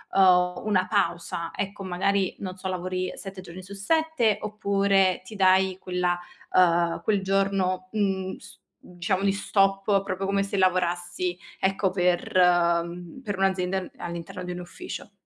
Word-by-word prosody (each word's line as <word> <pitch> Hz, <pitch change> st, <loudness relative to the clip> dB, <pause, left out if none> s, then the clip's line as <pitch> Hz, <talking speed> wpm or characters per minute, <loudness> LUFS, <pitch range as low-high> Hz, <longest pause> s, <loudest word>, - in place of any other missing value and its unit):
ehm, 180 Hz, -2 st, +4 dB
una 185 Hz, -4 st, +2 dB
pausa? 170 Hz, -4 st, -1 dB
Ecco, 200 Hz, 0 st, -4 dB
magari, 190 Hz, +1 st, 0 dB
non 185 Hz, -2 st, -5 dB
so, 190 Hz, -, -5 dB
lavori 185 Hz, 0 st, -2 dB
7 195 Hz, -1 st, -8 dB
giorni 185 Hz, 0 st, -10 dB
su 195 Hz, +2 st, -11 dB
7, 250 Hz, -1 st, +1 dB
oppure 200 Hz, -3 st, +2 dB
ti 210 Hz, +3 st, -11 dB
dai 190 Hz, -1 st, +4 dB
quella 180 Hz, -1 st, 0 dB, 0.4 s
ehm, 170 Hz, -2 st, +3 dB
quel 205 Hz, 0 st, +1 dB
giorno, 190 Hz, -1 st, 0 dB
mhmm, 195 Hz, -3 st, -1 dB
s -, -, -14 dB, 0.3 s
diciamo 180 Hz, +2 st, -2 dB
di 200 Hz, -, +3 dB
stop, 195 Hz, 0 st, +2 dB
proprio 190 Hz, 0 st, -3 dB
come 195 Hz, 0 st, +1 dB
se 200 Hz, 0 st, -2 dB
lavorassi, 180 Hz, -1 st, 0 dB, 0.2 s
ecco, 190 Hz, 0 st, +1 dB
per, 180 Hz, -1 st, 0 dB
ehm 175 Hz, +2 st, +2 dB
per 205 Hz, -3 st, -3 dB
un'azienda 190 Hz, -1 st, +1 dB
a 185 Hz, -2 st, -7 dB
all'interno 170 Hz, 0 st, -6 dB
di 180 Hz, -, -4 dB
un 175 Hz, -, -6 dB
ufficio. 175 Hz, +3 st, -8 dB
185 Hz, 150 wpm, -26 LUFS, 180-195 Hz, 0.4 s, ehm